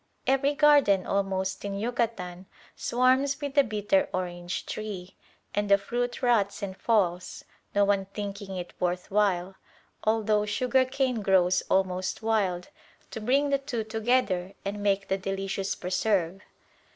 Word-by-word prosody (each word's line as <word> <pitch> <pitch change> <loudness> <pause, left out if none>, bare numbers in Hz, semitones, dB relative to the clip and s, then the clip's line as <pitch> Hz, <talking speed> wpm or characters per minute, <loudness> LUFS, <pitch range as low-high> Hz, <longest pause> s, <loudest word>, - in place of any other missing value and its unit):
Every 270 +2 +2
garden 285 -11 +5
almost 190 -1 -1
in 200 -1 -3
Yucatan 200 -5 -3 0.3
swarms 260 +3 +2
with 285 -2 -4
the 285 -1 +5
bitter 225 +5 +1
orange 175 -1 -4
tree, 200 -4 -6 0.4
and 205 0 -1
the 200 - +7
fruit 240 +5 -3
rots 210 -5 +2
and 190 -2 -4
falls, 185 -5 0 0.3
no 205 0 +5
one 200 -1 +1
thinking 200 -1 -6
it 180 -1 -6
worth 180 +1 -2
while, 195 -2 +1 0.5
although 215 -1 +2
sugar 255 +5 +2
cane 260 -3 -1
grows 185 -2 +3
almost 185 +1 0
wild, 195 -6 0 0.4
to 220 - -6
bring 275 +6 +2
the 275 - +3
two 260 -5 -3
together 215 -4 0
and 205 +1 -3
make 200 -1 +1
the 195 - 0
delicious 195 0 -3
preserve. 185 0 0
205 Hz, 140 wpm, -27 LUFS, 190-240 Hz, 0.5 s, the